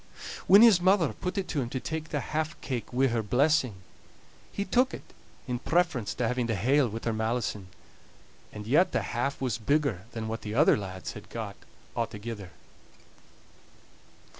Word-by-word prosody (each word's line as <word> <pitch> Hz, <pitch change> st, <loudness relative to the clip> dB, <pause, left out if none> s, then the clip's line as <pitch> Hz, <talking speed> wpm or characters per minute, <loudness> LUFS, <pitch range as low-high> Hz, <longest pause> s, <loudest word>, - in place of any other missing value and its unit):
When 200 Hz, +3 st, +9 dB
his 215 Hz, -7 st, +7 dB
mother 185 Hz, -4 st, +3 dB
put 180 Hz, +2 st, -4 dB
it 190 Hz, -2 st, -1 dB
to 145 Hz, -, 0 dB
him 120 Hz, -, -3 dB
to 130 Hz, -, -3 dB
take 160 Hz, +3 st, -4 dB
the 145 Hz, -, -1 dB
half 155 Hz, +1 st, -1 dB
cake 125 Hz, -4 st, -4 dB
wi' 130 Hz, +2 st, +2 dB
her 115 Hz, -1 st, 0 dB
blessing, 125 Hz, -2 st, +1 dB, 0.7 s
he 200 Hz, -, -3 dB
took 250 Hz, +7 st, +2 dB
it -, -, -14 dB, 0.3 s
in 125 Hz, -2 st, -2 dB
preference 160 Hz, -9 st, 0 dB
to 125 Hz, -, 0 dB
having 125 Hz, 0 st, 0 dB
the 115 Hz, -, 0 dB
hale 130 Hz, +6 st, +3 dB
wi' 115 Hz, +2 st, -5 dB
her 115 Hz, -, 0 dB
malison; 110 Hz, -3 st, -2 dB, 0.8 s
and 105 Hz, -1 st, -8 dB
yet 150 Hz, -, +3 dB
the -, -, +1 dB
half 135 Hz, +4 st, -1 dB
was 125 Hz, -2 st, -1 dB
bigger 140 Hz, -6 st, 0 dB
than 110 Hz, -1 st, -4 dB
what 110 Hz, +1 st, -4 dB
the 105 Hz, 0 st, -5 dB
other 150 Hz, +5 st, +6 dB
lads 95 Hz, -2 st, -5 dB
had 105 Hz, -, -11 dB
got 110 Hz, -4 st, -5 dB, 0.4 s
a'thegither. 110 Hz, -3 st, -4 dB
125 Hz, 170 wpm, -28 LUFS, 110-155 Hz, 0.8 s, When